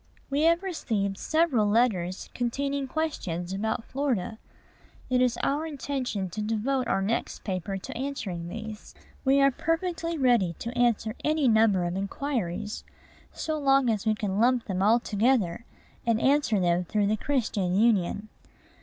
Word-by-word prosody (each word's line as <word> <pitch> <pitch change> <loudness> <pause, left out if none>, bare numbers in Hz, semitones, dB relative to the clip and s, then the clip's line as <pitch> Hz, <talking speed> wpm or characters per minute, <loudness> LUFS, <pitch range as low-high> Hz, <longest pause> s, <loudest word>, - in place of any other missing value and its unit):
We 280 +2 +1
have 335 +3 +3
received 210 - -2
several 310 -10 +2
letters 205 -5 +1
containing 275 +3 -1
questions 190 - -3
about 220 +3 -2
Florida. 240 -6 -2 0.7
It 250 0 +3
is 250 -1 +2
our 300 +3 0
intention 265 -9 -3
to 215 - -4
devote 230 +4 0
our 195 - +1
next 225 +4 -2
paper 195 -1 -3
to 190 - -8
answering 215 -11 -4
these. 220 +1 -8 0.3
We 275 +1 +4
are 275 0 +5
perfectly 335 +3 -2
ready 240 - +3
to 235 +2 -6
answer 235 -3 +2
any 305 -2 +2
number 220 -5 +4
of 175 +1 -2
inquiries, 210 -1 -3 0.5
so 315 -1 -3
long 270 -3 +4
as 215 0 -2
we 215 - +3
can 205 -2 -2
lump 245 +1 +3
them 190 -2 -2
all 220 +4 +5
together, 225 -3 +1 0.4
and 230 -1 +2
answer 265 -5 +3
them 175 0 +2
through 205 +4 0
"The 210 +2 +2
Christian 210 -9 0
Union." 210 -1 +2
230 Hz, 150 wpm, -27 LUFS, 200-275 Hz, 0.7 s, are